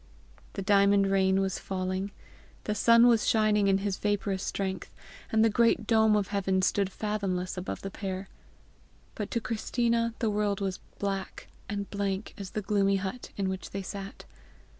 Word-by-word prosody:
The 195 - -4
diamond 200 0 +4
rain 190 0 +3
was 190 -1 -1
falling, 185 +1 -3 0.5
the 210 - -1
sun 230 +2 +6
was 235 -2 +4
shining 215 -2 +3
in 195 0 +4
his 195 -1 -2
vaporous 205 -2 -1
strength, 190 -1 -3 0.4
and 220 0 +4
the - - +4
great 230 0 +3
dome 220 -1 +4
of 205 -2 0
heaven 190 -2 0
stood 195 0 +1
fathomless 195 -3 -2
above 180 0 -5
the 195 - -4
pair; 190 -1 -5 0.9
but 210 - -4
to 235 - 0
Christina 230 0 0
the 225 -2 0
world 205 -1 0
was 195 -2 -2 0.2
black 195 -1 -4 0.2
and 200 -1 -3
blank 200 0 -2
as 195 -2 -6
the 215 - -4
gloomy 195 -1 +2
hut 195 +6 -4
in 195 -1 0
which 190 0 -4
they 195 0 -5
sat. 195 +1 -7
200 Hz, 165 wpm, -29 LUFS, 190-215 Hz, 0.9 s, sun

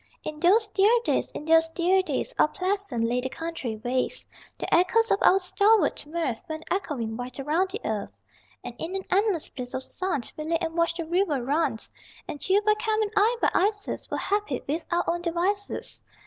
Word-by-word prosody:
In 305 -1 -6
those 405 +7 +4
dear 405 0 +4 0.2
days, - - +1
in 300 - -6
those 325 0 +5
dear 360 +3 +2
days, 440 +6 -2
All - - +6
pleasant 380 - -1
lay 245 +2 0
the 260 - -3
country 325 -7 -4
ways; 255 - 0 0.3
The - - -3
echoes 450 +7 +4
of 395 - +3
our 380 - +6
stalwart 390 -3 +2
mirth 310 -7 -2
Went 315 0 -5
echoing 265 - -2
wide 245 +3 -6
around 320 +7 +1
the 425 +5 -5
earth - - -4 0.4
And - - -6
in 345 +4 -4
an 385 - -4
endless 390 -4 +1
bliss 250 -2 -7
of 260 - -2
sun 370 -5 -2
We 305 - -5
lay 330 +1 +1
and 325 0 -4
watched 335 0 +1
the 335 - -3
river 330 -6 0
run. 285 -2 +1 0.5
And 295 - -5
you 400 +2 +4
by 425 0 +4
Cam 435 -1 0
and 415 - -3
I 440 +4 +3
by - - +4
Isis 410 +2 -1
Were - - -2
happy 410 -11 -1
with 315 +3 -2
our 345 0 0
own 345 +1 0
devices. 365 +4 -2
340 Hz, 200 wpm, -26 LUFS, 300-400 Hz, 0.5 s, All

